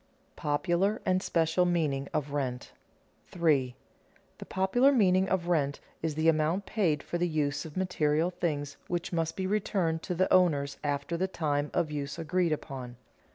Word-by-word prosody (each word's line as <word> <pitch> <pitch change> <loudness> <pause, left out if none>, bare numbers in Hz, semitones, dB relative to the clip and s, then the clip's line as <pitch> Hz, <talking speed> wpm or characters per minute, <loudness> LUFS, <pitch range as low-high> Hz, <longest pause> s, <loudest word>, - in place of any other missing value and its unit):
[Sidenote: - - -38
Popular 175 +7 0
and 185 0 +2
special 165 +1 +2
meaning 155 -6 0
of 150 -2 -2
rent] 130 -4 -3 0.6
3. 145 -8 +1 0.6
_The - - -10
popular 215 +9 +3
meaning 190 -6 +3
of 175 -2 0
rent 145 -5 +1 0.2
is 160 -2 -2
the 155 +1 +1
amount 165 +4 +2
paid 170 -10 0
for 175 - -3
the 175 - +2
use 145 -2 -1
of 155 +1 -9
material 165 -2 +1
things 145 -5 -3
which 175 0 -3
must 165 -1 -1
be 190 - -1
returned 185 -5 0
to 180 - -3
the 185 +2 +2
owners 145 -6 +3
after 145 +3 -1
the 190 +2 0
time 150 -5 -1
of 155 - 0
use 140 -1 -4
agreed 170 +1 0
upon. 130 -5 -5
165 Hz, 165 wpm, -29 LUFS, 145-180 Hz, 0.6 s, popular